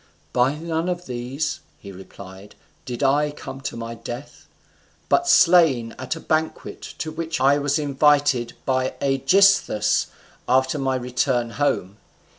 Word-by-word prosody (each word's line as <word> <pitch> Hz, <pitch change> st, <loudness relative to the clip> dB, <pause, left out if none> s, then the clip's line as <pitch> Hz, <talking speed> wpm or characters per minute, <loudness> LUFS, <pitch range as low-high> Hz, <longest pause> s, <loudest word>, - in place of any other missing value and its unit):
"By 125 Hz, +3 st, +2 dB
none 165 Hz, +2 st, -3 dB
of 180 Hz, 0 st, -4 dB
these," 125 Hz, +5 st, -4 dB, 0.2 s
he 100 Hz, -, -11 dB
replied, 95 Hz, +1 st, -12 dB, 0.3 s
"did 125 Hz, +2 st, -4 dB
I 145 Hz, +2 st, +3 dB
come 140 Hz, -2 st, -9 dB
to 135 Hz, -, -5 dB
my 115 Hz, 0 st, -6 dB
death; 120 Hz, +4 st, -9 dB, 0.6 s
but 350 Hz, 0 st, +2 dB
slain 165 Hz, -, +4 dB
at 130 Hz, +4 st, -3 dB
a -, -, -8 dB
banquet 160 Hz, 0 st, -2 dB, 0.2 s
to 160 Hz, -, -4 dB
which 160 Hz, -1 st, -4 dB
I 140 Hz, +2 st, +4 dB
was 145 Hz, +1 st, 0 dB
invited 145 Hz, -4 st, +2 dB
by 130 Hz, -1 st, 0 dB
Aegisthus 135 Hz, -, +3 dB, 0.4 s
after 130 Hz, +3 st, +2 dB
my 135 Hz, -1 st, 0 dB
return 125 Hz, -1 st, -1 dB
home. 105 Hz, -8 st, -1 dB
135 Hz, 135 wpm, -22 LUFS, 120-155 Hz, 0.6 s, slain